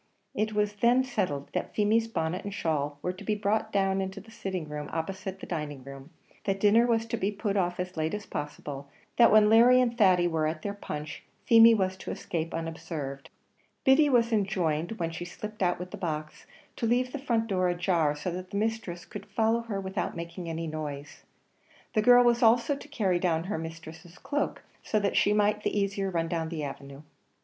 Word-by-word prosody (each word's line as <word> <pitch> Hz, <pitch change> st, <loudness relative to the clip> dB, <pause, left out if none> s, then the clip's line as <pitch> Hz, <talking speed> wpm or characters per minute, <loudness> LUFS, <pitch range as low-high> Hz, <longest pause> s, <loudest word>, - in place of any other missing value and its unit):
It 215 Hz, +1 st, -1 dB
was 210 Hz, 0 st, +1 dB
then 240 Hz, +5 st, +3 dB
settled 180 Hz, -, -2 dB
that -, -, -3 dB
Feemy's 220 Hz, +2 st, +2 dB
bonnet 180 Hz, -4 st, -2 dB
and 205 Hz, -, -5 dB
shawl 150 Hz, -6 st, -1 dB
were 180 Hz, -, -1 dB
to 190 Hz, +3 st, -11 dB
be 210 Hz, +1 st, 0 dB
brought 215 Hz, +1 st, 0 dB
down 195 Hz, -1 st, +1 dB
into 190 Hz, +1 st, -4 dB
the 215 Hz, +3 st, -15 dB
sitting 190 Hz, -7 st, -4 dB
room 150 Hz, 0 st, -6 dB
opposite 190 Hz, +3 st, -4 dB
the -, -, -8 dB
dining 150 Hz, -5 st, -5 dB
room 135 Hz, +2 st, -10 dB, 0.4 s
that 195 Hz, -1 st, 0 dB
dinner 220 Hz, +4 st, +5 dB
was 225 Hz, -1 st, +1 dB
to 230 Hz, 0 st, -3 dB
be 200 Hz, 0 st, 0 dB
put 205 Hz, 0 st, -2 dB
off 180 Hz, -2 st, 0 dB
as 180 Hz, 0 st, -4 dB
late 160 Hz, +3 st, -1 dB
as 210 Hz, -, -6 dB
possible 145 Hz, -1 st, -6 dB, 0.3 s
that 235 Hz, -1 st, +7 dB
when 215 Hz, -1 st, +7 dB
Larry 235 Hz, +3 st, +7 dB
and 240 Hz, -2 st, +1 dB
Thady 185 Hz, -6 st, +4 dB
were 160 Hz, -2 st, 0 dB
at 155 Hz, 0 st, -4 dB
their 200 Hz, -, -2 dB
punch, 150 Hz, -6 st, -6 dB, 0.2 s
Feemy 230 Hz, 0 st, +8 dB
was 190 Hz, -2 st, 0 dB
to -, -, -8 dB
escape 165 Hz, -1 st, -3 dB
unobserved. 160 Hz, -4 st, -5 dB, 0.5 s
Biddy 280 Hz, +3 st, +5 dB
was 235 Hz, -3 st, +3 dB
enjoined, 180 Hz, -4 st, 0 dB
when 170 Hz, -6 st, -3 dB
she 165 Hz, +1 st, -6 dB
slipped 210 Hz, +4 st, -8 dB
out 180 Hz, -1 st, +2 dB
with 180 Hz, +1 st, -7 dB
the -, -, -6 dB
box, 155 Hz, -3 st, -5 dB, 0.3 s
to 230 Hz, -, -1 dB
leave 250 Hz, +2 st, +1 dB
the 290 Hz, -, -4 dB
front 235 Hz, -4 st, 0 dB
door 185 Hz, -4 st, +1 dB
ajar, 175 Hz, -4 st, +1 dB
so 150 Hz, +5 st, -4 dB
that 185 Hz, +2 st, -7 dB
her 200 Hz, -, -2 dB
mistress 215 Hz, -5 st, -2 dB
could 205 Hz, -2 st, -9 dB
follow 220 Hz, +3 st, +1 dB
her 220 Hz, -4 st, -4 dB
without 190 Hz, +1 st, -3 dB
making 170 Hz, +1 st, -6 dB
any 165 Hz, 0 st, -3 dB
noise. 150 Hz, -2 st, -6 dB, 0.7 s
The 215 Hz, -, +3 dB
girl 245 Hz, +2 st, +7 dB
was 240 Hz, 0 st, +3 dB
also 235 Hz, +4 st, +4 dB
to 280 Hz, -, -11 dB
carry 200 Hz, -11 st, 0 dB
down 165 Hz, -2 st, +1 dB
her 185 Hz, -2 st, -3 dB
mistress' 160 Hz, +1 st, -9 dB
cloak 290 Hz, 0 st, -2 dB, 0.2 s
so 215 Hz, -, 0 dB
that 200 Hz, -1 st, -1 dB
she 205 Hz, -, +4 dB
might 210 Hz, 0 st, +2 dB
the 210 Hz, -, 0 dB
easier 200 Hz, -1 st, -1 dB
run 165 Hz, -2 st, -1 dB
down 165 Hz, -1 st, -2 dB
the 160 Hz, -3 st, -4 dB
avenue. 140 Hz, 0 st, -8 dB
190 Hz, 205 wpm, -28 LUFS, 160-215 Hz, 0.7 s, Feemy